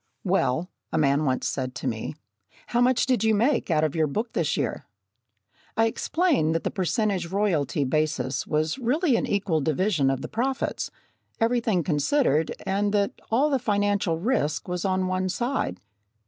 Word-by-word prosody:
"Well," 175 -3 0 0.2
a - - 0
man 145 0 +2
once 130 -2 0
said 130 -2 -3
to 120 - -4
me, 115 +4 -3 0.5
"how 240 - 0
much 250 0 +3
did 255 -3 +1
you 220 -1 +3
make 235 +3 +1
out 155 -2 +2
of 155 -3 +1
your 160 -2 +2
book 220 - -3
this 160 -2 0
year?" 140 - -2 0.9
I 225 - +4
explained 225 - +1
that 165 - -1
the - - -1
percentage 195 -1 0
royalty 170 -7 0
basis 135 -2 -1
was 155 - 0
really 265 +4 +2
an - - 0
equal 195 -6 0
division 155 0 +1
of 135 -1 -1
the - - -3
profits, 260 +4 -2 0.5
everything 225 -6 +1
considered, 155 - +1
and 200 +1 0
that 200 -1 +2 0.2
all 275 +7 +2
the 270 - +2
financial 205 -6 +1
risk 165 - 0
was 180 0 -3
on 185 -1 +1
one 185 0 -1
side. 240 - -2
185 Hz, 165 wpm, -25 LUFS, 150-225 Hz, 0.9 s, I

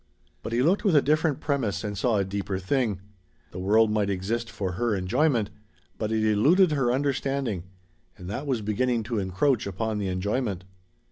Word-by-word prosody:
But 115 - -6
he 120 +2 +2
looked 180 +7 +2
with 195 -7 +3
a 145 - +7
different 155 0 +1
premise 115 -9 -1
and 105 -1 -3
saw 110 +3 +1
a 100 - +2
deeper 100 0 -3
thing. 100 0 -1 0.5
The 90 - -7
world 105 +4 +3
might 105 -2 +1
exist 110 +5 -2
for 95 -3 -3
her 115 +3 0
enjoyment, 115 +4 +1 0.5
but 110 -1 -2
it 110 -1 +1
eluded 155 - +4
her 135 -5 +1
understanding. 135 -7 -1 0.5
And 90 - -9
that 130 +9 -4
was 125 -6 -1
beginning 115 +3 0
to 115 0 -2
encroach 100 +6 +1
upon 105 +3 -2
the 100 - -2
enjoyment. 100 +1 -2
110 Hz, 180 wpm, -26 LUFS, 100-135 Hz, 0.5 s, a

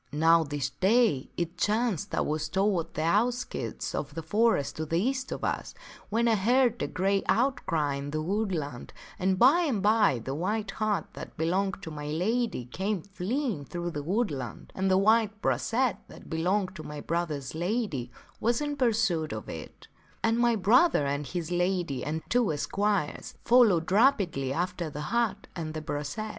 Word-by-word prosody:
" - - -38 0.2
Now 165 0 +6
this 145 -2 -3
day 205 - +2
it 170 0 -3
chanced 215 -4 0
I - - +1
was 155 +1 -1
toward 185 -1 0
the 155 - -1
outskirts 230 +9 -1
of 145 - -4
the 165 - -4
forest 210 -3 +1
to 160 - -2
the 165 - 0
east 260 +5 -1
of - - -5
us, - - -2 0.3
when 230 +3 +1
I 230 - +4
heard 240 +3 +2
a - - 0
great 195 +1 0
outcry 190 - +1
in 140 +1 -5
the 155 +1 -2
woodland, 165 - -2 0.3
and 190 0 +1
by 275 - +6
and 275 - 0
by 210 - +4
the 125 +4 -5
white 200 +6 -2
hart 215 -2 -1
that - - -9
belonged 190 +4 0
to 160 - -6
my 150 -1 -6
lady 190 - -1
came 190 - -2
fleeing 200 - -2
through 175 +4 -4
the 145 - -4
wood 200 +7 0
land, 125 -6 -7
and 190 0 0
the 185 - +4
white 215 +1 +3
brachet 240 +2 +1
that - - -13
belonged 185 +4 0
to - - -6
my 150 -1 -7
brother's 155 -6 -3
lady 170 - -2 0.3
was 235 +1 +1
in 290 -1 -2
pursuit 220 - +1
of - - -6
it; - - -9 0.4
and 225 +1 +2
my 240 -1 +3
brother 220 - +4
and 140 +1 -2
his 175 +2 -4
lady 175 -5 0
and 155 +2 -3
two 240 -6 +2
esquires 195 +2 -1
followed 210 -9 +4
rapidly 195 - +3
after 170 +2 -2
the 150 - -7
hart 220 -4 0
and 160 -3 -5
the 155 - -3
brachet. 145 +9 -4
190 Hz, 175 wpm, -28 LUFS, 155-225 Hz, 0.4 s, Now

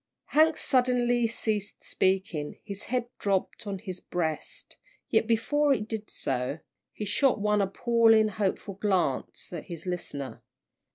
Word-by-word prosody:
Hank 315 +1 +5
suddenly 245 -2 +2
ceased 215 -2 -2
speaking, 185 -6 0
his 200 -2 -6
head 245 -1 -1
dropped 200 +1 -1
on 200 -1 -2
his 185 -2 -7
breast, 160 -4 -4 0.3
yet - - +3
before 285 +6 +3
it 210 -3 -4
did 220 -2 -5
so, 130 +2 -1 0.3
he 210 - -5
shot 255 +3 +2
one 210 0 +2
appealing, 225 +2 +4
hopeful 200 -1 -2
glance 185 -7 -1
at 170 - -5
his 170 -1 -7
listener. 145 -7 -4
210 Hz, 130 wpm, -28 LUFS, 185-230 Hz, 0.3 s, Hank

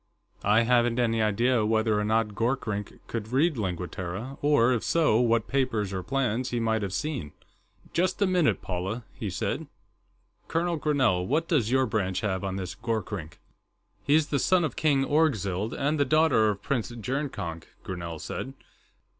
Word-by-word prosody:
I 105 +3 +4
haven't 120 0 +3
any 115 -2 +2
idea 115 +3 +2
whether 110 0 +2
or - - 0
not 110 +1 +1
Gorkrink 115 -3 -2
could 110 -1 -5
read 150 +5 +3
Lingua 90 -5 -2
Terra, 100 +10 -6
or, 145 -4 +4
if 120 - -1
so, 155 -10 +3
what 115 -2 +2
papers 115 -7 0
or 95 - -2
plans 125 +1 -1
he 120 - -1
might 110 -1 +1
have 100 -2 -3
seen." 135 - -3 0.6
"Just 185 +2 +1
a 200 - +4
minute, 180 -5 +2
Paula," 95 +6 -3
he - - -4
said. - - -3 0.8
"Colonel 170 +1 0
Grinell, 130 -13 +2
what 160 +4 +1
does 130 -10 +2
your 130 +1 +3
branch 100 -5 -1
have 95 -2 -1
on 95 -1 -2
this 95 -2 -4
Gorkrink?" 105 -8 -4 0.7
"He's 150 +1 +3
the 140 - +1
son 185 +3 +3
of 155 - -2
King 140 -3 +2
Orgzild, 110 - +1
and 145 +2 -1
the - - +5
daughter 140 -6 +4
of 100 -2 -3
Prince 125 -5 -1
Jurnkonk," 120 - -4 0.2
Grinell 85 -3 -5
said. 135 - -5
115 Hz, 165 wpm, -27 LUFS, 105-140 Hz, 0.8 s, the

